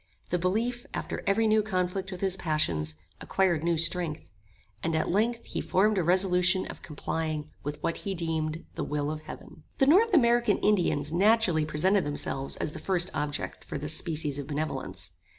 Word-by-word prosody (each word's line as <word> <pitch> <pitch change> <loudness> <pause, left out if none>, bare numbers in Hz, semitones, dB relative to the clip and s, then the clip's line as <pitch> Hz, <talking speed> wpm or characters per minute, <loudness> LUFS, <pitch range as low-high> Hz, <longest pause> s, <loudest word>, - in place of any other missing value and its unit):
The 180 - 0
belief, 230 +7 -1
after - - -4
every 210 +3 +3
new 215 0 +4
conflict 190 -1 -2
with 185 - -7
his 190 -2 +1
passions, 85 - 0 0.3
acquired 175 -5 +1
new 170 -1 +1
strength; 170 -1 +2 0.6
and, 165 0 -1
at 155 - 0
length, 230 +5 +1
he - - -3
formed 210 +3 +2
a - - +1
resolution 180 +1 +3
of - - -8
complying 155 0 -3
with 145 +1 -4
what 165 - 0
he 195 -1 -3
deemed 160 -1 -2
the - - -3
will 150 0 -1
of 155 0 -5
heaven. 155 - -11 0.2
The 270 - +4
North 395 +11 +5
American 240 -5 +4
Indians 170 -7 +1
naturally 195 -4 +3
presented 185 +6 +2
themselves 140 -2 -3
as - - -2
the - - -8
first 180 -2 +1
objects 145 0 -3
for - - -4
this 150 +2 0
species 155 -4 -2
of 140 - -6
benevolence. 135 - -3
170 Hz, 175 wpm, -28 LUFS, 150-195 Hz, 0.6 s, North